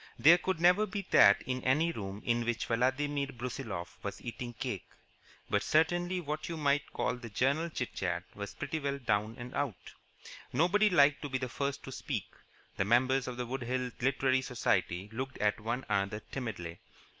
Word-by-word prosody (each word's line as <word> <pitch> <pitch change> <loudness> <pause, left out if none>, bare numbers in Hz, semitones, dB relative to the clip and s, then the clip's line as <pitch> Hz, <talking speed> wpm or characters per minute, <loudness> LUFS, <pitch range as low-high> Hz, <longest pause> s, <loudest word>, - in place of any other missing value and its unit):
There 160 +9 +7
could 190 -3 -1
never 180 +5 +5
be 200 0 -4
that 100 - +7
in 130 0 -3
any 155 +6 +3
room 100 -6 -6
in 120 0 +2
which 120 -1 -1
Vladimir 140 +4 +1
Brusiloff 115 -8 -6
was 100 - -4
eating 120 0 -6
cake. - - -4 0.6
But - - +1
certainly 175 +3 +2
what 150 -1 -4
you 165 - -3
might 145 -1 +1
call 125 0 -1
the 120 -1 -8
general 140 +10 +1
chit 125 -6 -4
chat 90 -2 -2
was 100 -1 -7
pretty 160 - -3
well 140 -1 -1
down 110 -3 0
and 120 +2 -8
out. 135 -10 -3 0.6
Nobody 205 +6 +4
liked 145 -5 +5
to 145 - -4
be 130 - 0
the 130 -1 -3
first 140 +2 -3
to 135 - -7
speak. - - -3 0.5
The - - +2
members 130 +4 +3
of 125 -1 -5
the 125 - -2
Wood 130 +3 -4
Hills 125 0 -2
Literary 130 0 +2
Society 110 -7 0
looked 130 +3 -4
at 105 +1 +1
one 120 +4 -3
another 100 +2 0
timidly. 100 -10 -5
130 Hz, 180 wpm, -32 LUFS, 115-145 Hz, 0.6 s, There